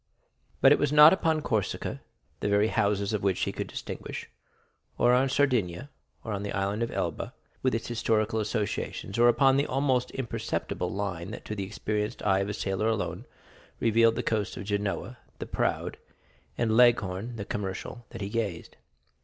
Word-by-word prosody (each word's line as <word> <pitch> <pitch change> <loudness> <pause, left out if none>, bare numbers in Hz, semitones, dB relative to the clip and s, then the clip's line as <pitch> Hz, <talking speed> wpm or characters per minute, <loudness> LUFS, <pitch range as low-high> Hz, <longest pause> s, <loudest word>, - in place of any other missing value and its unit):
But 135 - +7
it - - +6
was 145 -1 +1
not 150 +2 +9
upon 160 -4 +1
Corsica, 110 -8 -2 0.4
the - - -1
very 105 +2 +3
houses 100 -1 +1
of 105 - 0
which 95 -2 0
he - - 0
could - - -4
distinguish; - - -6 0.7
or 120 0 +4
on 130 +2 +3
Sardinia; 125 -4 +1 0.3
or 110 - -4
on 100 - -3
the 100 0 -4
Island 100 +3 -1
of 115 - 0
Elba, - - -3 0.3
with 130 -2 +1
its 115 - -3
historical 110 -1 0
associations; 105 -1 -3
or 120 - +7
upon 135 +3 +5
the 140 - +1
almost 130 -2 +1
imperceptible 115 -3 -3
line 95 -3 -3
that 110 - -8
to - - -4
the 100 -2 -3
experienced 105 +3 -3
eye 95 -2 +3
of 100 +1 -1
a - - -2
sailor 95 +2 -1
alone 90 -6 -2 0.5
revealed 115 0 +4
the - - -2
coast 105 -3 -1
of - - -5
Genoa 105 +4 -2 0.2
the - - -5
proud, - - -1 0.6
and 110 -2 +1
Leghorn 115 -2 +3
the 100 -3 -5
commercial, 100 +5 -5
that - - -9
he 100 - -3
gazed. 105 -6 -3
110 Hz, 175 wpm, -28 LUFS, 100-120 Hz, 0.7 s, not